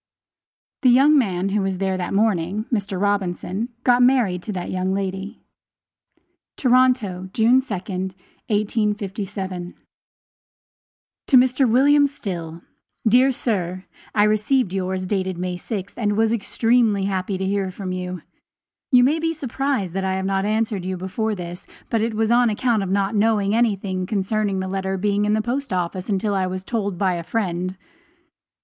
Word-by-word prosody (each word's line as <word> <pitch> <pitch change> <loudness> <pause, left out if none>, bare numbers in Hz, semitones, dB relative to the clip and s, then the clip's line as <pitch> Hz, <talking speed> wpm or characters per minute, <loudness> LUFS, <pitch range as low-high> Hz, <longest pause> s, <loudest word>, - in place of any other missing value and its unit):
The 260 - +5
young 275 +5 +6
man 195 -8 +1
who 205 +1 0
was 190 -1 -1
there 190 0 0
that 180 -1 -3
morning, 200 -1 +1
Mr. 200 -4 -1
Robinson, 200 +2 -1
got 245 0 +4
married 245 -8 +3
to 215 - -5
that 180 -2 -4
young 185 +1 -1
lady. 195 +2 -4 1.1
TORONTO, 245 -8 +2
June 240 +4 +4
2d, 190 -5 -4 0.3
1857. 200 -4 -2 1.5
To 265 - +6
MR. 255 +1 +3
WM. 285 +4 +5
STILL 170 - -6 0.4
Dear 250 +4 +5
Sir: 185 -7 -2 0.3
I 205 - +5
received 215 0 +2
yours 185 -1 -2
dated 190 -2 -2
May 180 0 -3
6th, 195 +2 -5
and 210 -3 -1
was 225 0 +3
extremely 225 -1 +2
happy 190 0 -2
to 190 - -2
hear 195 0 0
from 185 0 -6
you. 180 -2 -5 0.7
You 250 -2 +7
may 295 +6 +3
be 330 0 -1
surprised 270 - -2
that 195 0 -2
I 190 0 0
have 190 0 -2
not 195 0 0
answered 215 -2 0
you 185 0 -3
before 210 +4 -2
this, 175 -1 -8 0.2
but 225 - +2
it 225 0 -1
was 220 +1 +1
on 240 0 +4
account 225 0 +1
of 195 - -3
not 195 +2 0
knowing 210 -1 +2
anything 195 -5 0
concerning 205 -1 -1
the 190 - -3
letter 190 0 -2
being 205 +1 +1
in 210 - +2
the 215 0 +1
post 265 +5 -3
office 180 +2 -2
until 205 +1 0
I 190 -1 0
was 185 0 -4
told 205 -3 -2
so - - -13
by 190 -1 +1
a 170 -1 -4
friend. 185 -2 -2
200 Hz, 160 wpm, -22 LUFS, 185-225 Hz, 1.5 s, You